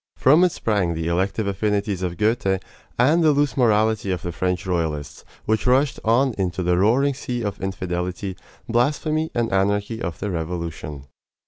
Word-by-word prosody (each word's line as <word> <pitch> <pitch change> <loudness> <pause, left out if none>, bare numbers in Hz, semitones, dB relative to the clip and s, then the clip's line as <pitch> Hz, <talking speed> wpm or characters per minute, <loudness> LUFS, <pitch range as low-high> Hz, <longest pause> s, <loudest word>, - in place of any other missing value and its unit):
From 150 +7 +5
it 180 - +4
sprang 100 - 0
the 80 0 -3
"elective 95 +5 0
affinities" 100 -1 -1
of 90 -2 -3
Goethe, 105 -3 +1 0.4
and 150 +8 +4
the 155 -2 +5
loose 145 0 +1
morality 110 -4 +2
of 90 -3 -2
the 85 - -3
French 90 +2 -2
royalists, 80 -6 -2 0.2
which 110 +3 0
rushed 130 +2 +3
on 120 +3 +3
into 90 -1 -1
the 90 0 +2
roaring 130 +8 +3
sea 125 -2 -4
of 100 -3 -4
infidelity, 90 0 -3 0.3
blasphemy, 155 +6 +1
and 120 -4 0
anarchy 100 +3 0
of 85 -6 -4
the 105 0 -3
Revolution. 80 -4 -5
100 Hz, 160 wpm, -22 LUFS, 90-120 Hz, 0.4 s, From